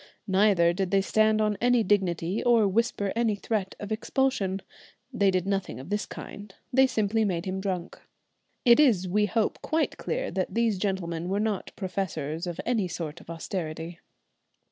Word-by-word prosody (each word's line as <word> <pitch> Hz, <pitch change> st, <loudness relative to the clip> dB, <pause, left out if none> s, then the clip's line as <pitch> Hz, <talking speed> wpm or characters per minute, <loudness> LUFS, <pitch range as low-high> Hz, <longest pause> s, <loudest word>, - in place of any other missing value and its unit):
Neither 190 Hz, -4 st, +4 dB
did 190 Hz, 0 st, -1 dB
they 195 Hz, 0 st, +3 dB
stand 215 Hz, +2 st, +3 dB
on 210 Hz, -1 st, 0 dB
any 245 Hz, -1 st, +4 dB
dignity 185 Hz, -2 st, 0 dB
or 230 Hz, -4 st, +4 dB
whisper 205 Hz, -1 st, 0 dB
any 230 Hz, -2 st, +2 dB
threat 200 Hz, -2 st, -2 dB
of 205 Hz, +1 st, -7 dB
expulsion. 215 Hz, -5 st, 0 dB, 0.5 s
They 200 Hz, -4 st, +3 dB
did 185 Hz, -1 st, 0 dB
nothing 195 Hz, -7 st, -2 dB
of 135 Hz, +6 st, -9 dB
this 205 Hz, 0 st, -1 dB
kind, 205 Hz, -1 st, -9 dB, 0.2 s
they 265 Hz, +1 st, +6 dB
simply 220 Hz, -2 st, +1 dB
made 180 Hz, -4 st, -1 dB
him 190 Hz, 0 st, -3 dB
drunk. 185 Hz, -2 st, -4 dB, 0.6 s
It 240 Hz, +1 st, +7 dB
is, 220 Hz, -11 st, +4 dB
we 210 Hz, +3 st, +2 dB
hope, 220 Hz, +2 st, 0 dB
quite 315 Hz, 0 st, 0 dB
clear -, -, -2 dB
that 185 Hz, +2 st, -2 dB
these 230 Hz, -4 st, +1 dB
gentlemen 180 Hz, -4 st, -2 dB
were 195 Hz, +2 st, 0 dB
not 210 Hz, -3 st, -2 dB
professors 170 Hz, -5 st, -3 dB
of 175 Hz, -, -5 dB
any 225 Hz, -6 st, +1 dB
sort 165 Hz, -2 st, -6 dB
of -, -, -17 dB
austerity. 165 Hz, 0 st, -5 dB
195 Hz, 165 wpm, -27 LUFS, 180-220 Hz, 0.6 s, It